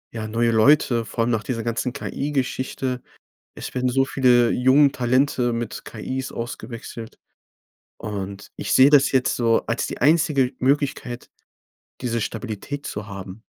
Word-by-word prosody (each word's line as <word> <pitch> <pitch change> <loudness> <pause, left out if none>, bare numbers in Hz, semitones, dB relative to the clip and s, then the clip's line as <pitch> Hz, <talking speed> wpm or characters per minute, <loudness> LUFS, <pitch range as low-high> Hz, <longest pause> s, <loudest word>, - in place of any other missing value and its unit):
ja, 110 -1 -4
neue 115 +2 +1
Leute, 120 +1 +4
vor 115 +1 -2
allem 120 - 0
nach 115 -2 0
dieser 115 -3 -3
ganzen 120 +2 -2
KI-Geschichte. 130 -2 -3 0.6
Es - - -7
werden 125 0 0
so 135 +2 +2
viele 125 -3 +3
jungen 135 +3 +4
Talente 125 -1 +1
mit 115 -1 -5
KIs 130 +4 -5
ausgewechselt. 115 -1 -7 0.8
Und 100 -1 -6
ich - - -4
sehe 135 +2 +7
das 145 -2 +5
jetzt 130 -2 +2
so 115 -2 +2
als 115 - -1
die - - -6
einzige 145 -3 +3
Möglichkeit, 135 -2 -1 0.7
diese 120 -2 -1
Stabilität 115 +6 -5
zu 105 0 -5
haben. 100 0 -8
125 Hz, 140 wpm, -23 LUFS, 115-135 Hz, 0.8 s, sehe